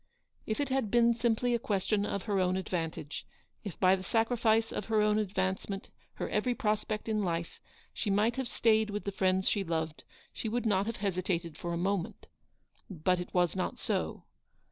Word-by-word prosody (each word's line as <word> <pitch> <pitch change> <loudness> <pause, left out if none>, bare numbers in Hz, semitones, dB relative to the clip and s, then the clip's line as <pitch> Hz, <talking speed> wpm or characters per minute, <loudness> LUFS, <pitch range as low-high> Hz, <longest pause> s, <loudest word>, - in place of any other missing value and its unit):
If 220 - -1
it 285 -2 0
had 260 -5 +1
been 235 +1 +5
simply 235 +1 +1
a 235 - +2
question 205 -1 0
of 200 - -2
her 205 -3 0
own 185 0 +2
218 - - 0
advantage, 165 -5 -4 0.4
if 200 -6 -7
by 185 0 +6
the 190 - -6
sacrifice 225 +1 +2
of 210 - -3
her 220 -1 +2
own 210 0 +3
advance 190 -2 -1
ment, 195 -1 -5 0.2
her - - -3
every 240 +4 0
prospect 215 -2 -1
in 215 -2 +1
life, 170 -2 -2 0.3
she 210 - -2
might 210 +4 +3
have 265 -2 -1
stayed 220 -2 +3
with 210 0 -3
the 200 - -2
friends 190 -1 +1
she 205 - +2
loved, 160 -3 -2 0.3
she 220 - -3
wonld 235 +2 -1
not 200 -2 +2
have 230 - -3
hesitated 180 -4 -1
for 175 - -4
a 170 - -1
moment. 185 0 -1 0.6
But 180 0 +1
it 180 - -5
was 175 -2 +2
not 185 - -2
so. - - -2
200 Hz, 195 wpm, -31 LUFS, 185-225 Hz, 0.6 s, by